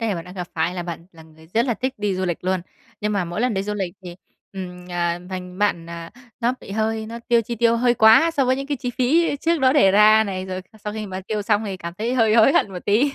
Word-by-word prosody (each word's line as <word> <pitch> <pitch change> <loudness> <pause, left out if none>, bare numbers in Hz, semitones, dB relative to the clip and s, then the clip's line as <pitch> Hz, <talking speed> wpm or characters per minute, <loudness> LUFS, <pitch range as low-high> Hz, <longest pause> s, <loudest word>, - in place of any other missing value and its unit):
đề 225 -4 0
bạn 165 - -6
đang 180 +1 -11
gặp 180 -2 -5
phải, 165 +2 0
là 180 - -3
bạn 170 0 -7
là 165 - -14
người 160 0 -18
rất 235 +3 +3
là 240 - +1
thích 260 +3 -3
đi 205 -2 -1
du 185 - -2
lịch 175 -1 -3
luôn, 185 0 0 0.4
nhưng 210 0 -1
mà 200 -3 0
mỗi 175 +5 -4
lần 245 -3 +1
đi 190 - -1
du 210 +1 -3
lịch 190 -4 -3
thì 175 -1 -8 0.4
ừm, 180 -2 -8
à, 175 -1 -1
thành 180 0 -7
bạn 200 -5 0
à, 170 0 -7 0.3
nó 235 +1 +2
bị - - -12
hơi 220 +1 -1
nó 230 +1 -7
tiêu 235 -1 +5
chi 235 +2 -5
tiêu 235 0 +3
hơi 240 0 +3
quá 225 +9 +6
so 290 -5 +1
với 255 +1 +2
những 275 - -5
cái 285 -1 -2
chi 245 0 -4
phí 290 +5 +2
trước 335 0 +1
đó 260 -1 +4
đề 230 -10 +5
ra 215 +2 +6
này, 190 -2 -4
rồi 185 0 -5 0.2
sau 210 - -3
khi 215 -1 -5
mà 190 0 -5
tiêu 210 -1 -1
xong 210 0 +1
thì 195 -3 -4
cảm 170 -1 -7
thấy 235 +3 -1
hơi 225 -3 +3
hối 230 +4 +6
hận 195 - +2
một 180 - -7
tí, 245 +8 +3
210 Hz, 290 wpm, -22 LUFS, 180-235 Hz, 0.4 s, quá